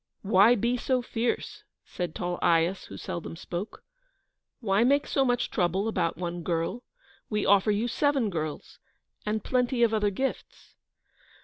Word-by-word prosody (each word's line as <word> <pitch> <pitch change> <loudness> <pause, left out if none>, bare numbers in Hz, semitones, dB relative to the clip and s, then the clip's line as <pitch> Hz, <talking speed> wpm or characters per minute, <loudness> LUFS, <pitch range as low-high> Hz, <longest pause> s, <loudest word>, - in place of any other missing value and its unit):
"Why 205 +4 +6
be 240 +3 0
so 255 0 0
fierce?" 235 0 -2 0.2
said 175 -3 -5
tall 175 0 -3
Aias, 170 +3 +2
who - - -10
seldom 170 -1 -5
spoke. 175 +4 -6 0.8
"Why 205 -1 +2
make 280 +4 +3
so 275 - +1
much 245 -2 0
trouble 190 +2 0
about 170 -8 -1
one 175 0 -4
girl? 170 +7 -2 0.5
We 210 -2 0
offer 200 +1 +4
you 210 +3 +1
seven 270 -3 +1
girls, 155 -3 -5 0.5
and 215 0 -1
plenty 250 -1 +1
of 225 -1 +3
other 210 -1 +2
gifts." 265 +7 -5
210 Hz, 145 wpm, -27 LUFS, 175-245 Hz, 0.8 s, Why